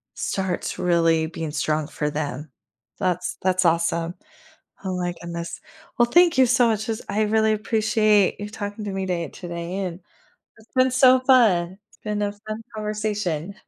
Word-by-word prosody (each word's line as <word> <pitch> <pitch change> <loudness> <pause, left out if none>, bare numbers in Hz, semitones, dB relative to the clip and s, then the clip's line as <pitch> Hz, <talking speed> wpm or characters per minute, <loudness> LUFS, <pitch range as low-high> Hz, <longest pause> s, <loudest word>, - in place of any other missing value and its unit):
starts 190 -2 -2
really 165 -2 +2
being 160 -1 -5
strong 150 0 -1
for 150 -1 -2
them. 150 -1 -4 0.5
That's 180 -1 -1
that's 185 0 +2
awesome, 170 +1 +1 0.7
oh 185 -1 -2
my 175 -1 -2
goodness, 170 0 -6 0.4
well, 240 - +5
thank 345 -5 +5
you 260 - +7
so 245 0 +4
much 215 -1 -1
'cause 225 -1 -3
I 205 +2 0
really 220 +1 +2
appreciate 215 -2 +2
you 205 - -5
talking 205 +1 -6
to 205 - -4
me 190 0 -2
day 175 -2 -1
today, 170 +1 -6
and 180 -3 -3 0.6
it's 220 0 -20
been 255 0 +4
so 255 0 +6
fun, 205 -9 +4
it's - - -24
been 210 -1 -2
a 205 0 0
fun 215 +2 -7
conversation. 210 -5 -2
195 Hz, 160 wpm, -23 LUFS, 170-215 Hz, 0.7 s, you